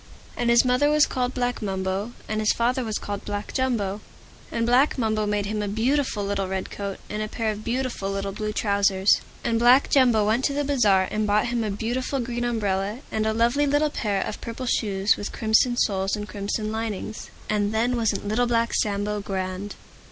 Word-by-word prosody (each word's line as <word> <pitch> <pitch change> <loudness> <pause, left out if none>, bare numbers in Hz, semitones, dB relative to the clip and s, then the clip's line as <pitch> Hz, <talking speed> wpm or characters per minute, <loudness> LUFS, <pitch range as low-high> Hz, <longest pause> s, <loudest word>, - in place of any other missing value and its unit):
And 240 - 0
his 235 +1 +5
mother 250 +4 +3
was 300 0 +5
called 250 0 -2
Black 245 -1 -1
Mumbo. 195 +2 -2
And 215 0 -2
his 215 -1 +3
father 250 +2 0
was 220 -2 -2
called 205 -1 -5
Black 205 0 -5
Jumbo. 215 -6 -1 0.5
And 230 -1 0
Black 255 +6 +3
Mumbo 215 -3 0
made 205 -1 0
him 210 +1 -2
a 205 - -2
beautiful 225 0 0
little 200 -1 -1
Red 190 0 -4
Coat, 200 -1 -5
and 210 +1 -4
a 215 - -2
pair 220 0 -2
of 210 0 -7
beautiful 240 -4 -2
little 195 0 -2
blue 215 +2 -3
trousers. 200 -2 +2 0.2
And 230 -1 +1
Black 245 +4 +5
Jumbo 245 -6 +4
went 225 +5 +1
to 280 - +1
the 290 +1 0
Bazaar, 210 -10 +3
and 215 0 0
bought 210 +3 +2
him 235 -1 0
a 215 - -2
beautiful 245 +6 -2
Green 240 0 -3
Umbrella, 210 -1 -1
and 220 0 0
a - - +2
lovely 240 +6 +2
little 290 +1 +2
Pair 200 -7 -1
of - - -6
Purple 235 +3 -5
Shoes 200 -4 +1
with 205 - -5
Crimson 230 +2 +2
Soles 195 -3 +1
and 210 0 -5
Crimson 210 +1 -3
Linings. 220 -1 -4 0.2
And 205 -1 0
then 235 +3 +1
wasn't 220 -4 -1
Little 240 +4 +1
Black 230 0 +1
Sambo 205 0 0
grand? 190 0 -4
215 Hz, 200 wpm, -24 LUFS, 205-240 Hz, 0.5 s, his